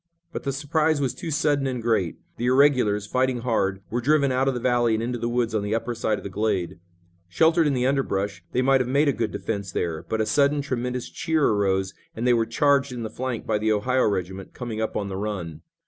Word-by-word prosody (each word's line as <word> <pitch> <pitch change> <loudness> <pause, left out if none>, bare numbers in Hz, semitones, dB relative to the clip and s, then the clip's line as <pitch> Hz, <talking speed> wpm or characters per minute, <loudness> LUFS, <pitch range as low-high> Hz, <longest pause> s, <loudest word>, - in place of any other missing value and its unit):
But - - -5
the 140 - 0
surprise 150 +3 +1
was 135 -3 0
too 170 - -6
sudden 145 -2 +1
and 125 -2 -2
great. 110 -7 0 0.2
The 120 - -1
irregulars, 125 -6 +3
fighting 130 +2 0
hard, 95 -5 0
were 120 +2 -1
driven 140 +1 +3
out 130 +1 +1
of 135 - +1
the - - -2
valley 120 -2 +2
and 110 - -2
into 120 0 -3
the 120 - -1
woods 120 -1 0
on 110 - +1
the 105 +2 -1
upper 115 +1 -2
side 110 -2 -1
of - - -9
the - - -4
glade. 95 -4 -1 0.5
Sheltered 160 - +3
in 140 - +1
the 125 0 0
underbrush, 100 -9 -1
they 125 - +1
might 135 0 +4
have 125 - -2
made 140 +3 +3
a - - +2
good 115 -2 -1
defense 100 -4 -4
there, 80 -3 -2
but 110 - -1
a 110 - +2
sudden 145 +3 +2
tremendous 125 -2 -3
cheer 160 -2 0
arose, 95 -2 +1 0.2
and 115 - -3
they 125 - +5
were 115 -1 +1
charged 140 +3 +2
in 120 -2 -5
the 110 - -5
flank 130 -2 -4
by 110 -1 0
the 110 +1 +1
Ohio 125 +5 +2
regiment, 95 -1 -4
coming 115 -3 -4
up 110 - -2
on 100 - -2
the 95 -1 -5
run. 90 -7 -4
120 Hz, 240 wpm, -24 LUFS, 105-135 Hz, 0.5 s, they